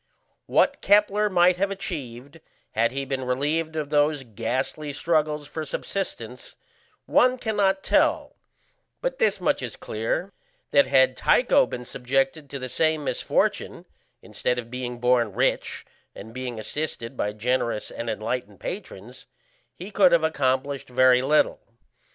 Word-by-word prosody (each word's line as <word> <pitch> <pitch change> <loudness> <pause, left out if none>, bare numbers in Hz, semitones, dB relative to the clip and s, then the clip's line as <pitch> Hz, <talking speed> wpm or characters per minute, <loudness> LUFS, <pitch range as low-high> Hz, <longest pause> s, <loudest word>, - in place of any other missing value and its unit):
What - - +2
Kepler 210 0 +3
might 180 -1 +4
have 200 +2 +1
achieved 145 -8 -6 0.3
had 115 +1 +1
he 135 +1 -3
been 135 -1 -3
relieved 150 +6 -1
of 150 -2 -3
those 145 -1 +2
ghastly 130 +6 -3
struggles 150 -1 0
for 160 +2 -5
subsistence 130 - -5 0.5
one 255 0 +4
cannot 205 -5 0
tell, - - +2 0.7
but - - -2
this 475 - +2
much - - +1
is - - -5
clear, - - -3 0.4
that 280 - +5
had 130 -1 +4
Tycho 260 - +4
been 125 - -6
subjected 135 +5 -1
to 140 - -5
the 130 -1 -5
same 155 +3 0
misfortune, - - -1 0.4
instead 125 - -2
of 120 -1 -6
being 125 -1 -4
born 120 -3 +2
rich - - -1 0.3
and 110 +3 -10
being 125 -2 -5
assisted 130 0 -4
by 105 - -1
generous 115 0 -1
and 115 0 -5
enlightened 110 -2 -4
patrons, 125 - -8 0.5
he 190 +4 -9
could 195 -3 +5
have 170 -2 +4
accomplished 140 -3 0
very 125 0 +5
little. 150 +4 +2
140 Hz, 140 wpm, -25 LUFS, 125-170 Hz, 0.7 s, that